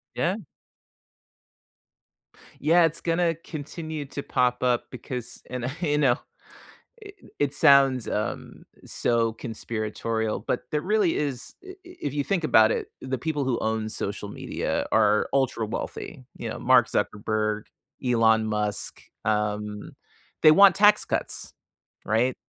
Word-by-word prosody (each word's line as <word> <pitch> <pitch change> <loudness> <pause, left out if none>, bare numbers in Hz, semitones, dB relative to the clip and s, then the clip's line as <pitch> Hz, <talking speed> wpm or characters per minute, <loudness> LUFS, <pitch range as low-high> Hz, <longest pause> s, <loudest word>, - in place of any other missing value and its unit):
Yeah. 185 +5 0 2.2
Yeah. 165 +4 +5
It's 165 0 0
gonna 165 0 +1
continue 155 -1 -7
to 140 +1 -6
pop 125 -1 0
up 125 -1 +2
because 125 -1 -6
and, 125 -1 -4
uh, - - -1
you 150 -4 +1
know, 135 -5 +4 0.9
i 405 - -9 0.3
it 145 -2 +1
sounds, 135 -4 +5
um, 105 - -4 0.2
so 115 -1 +1
conspiratorial, 110 -1 -3
but - - -2
there 150 - 0
really 200 0 +1
is 140 -4 -3
i 380 - -10
i - - -8
if 250 - -6
you 145 - 0
think 185 -2 -1
about 110 -7 +5
it, - - -1
the 130 0 -3
people 150 +1 -2
who 130 -2 0
own 110 0 -1
social 100 -1 -4
media - - -3
are 105 -1 +3
ultra 130 -5 +1
wealthy. 125 +4 -6
You - - -4
know, - - -6
Mark - - +4
Zuckerberg, 105 0 -1 0.4
Elon 110 -3 +3
Musk, 105 -1 -2 0.2
um, 105 -1 -2 0.5
they 155 - +9
want 195 +2 +7
tax 210 0 +5
cuts. - - -3 0.5
Right? 120 +4 +1
125 Hz, 135 wpm, -25 LUFS, 110-155 Hz, 2.2 s, they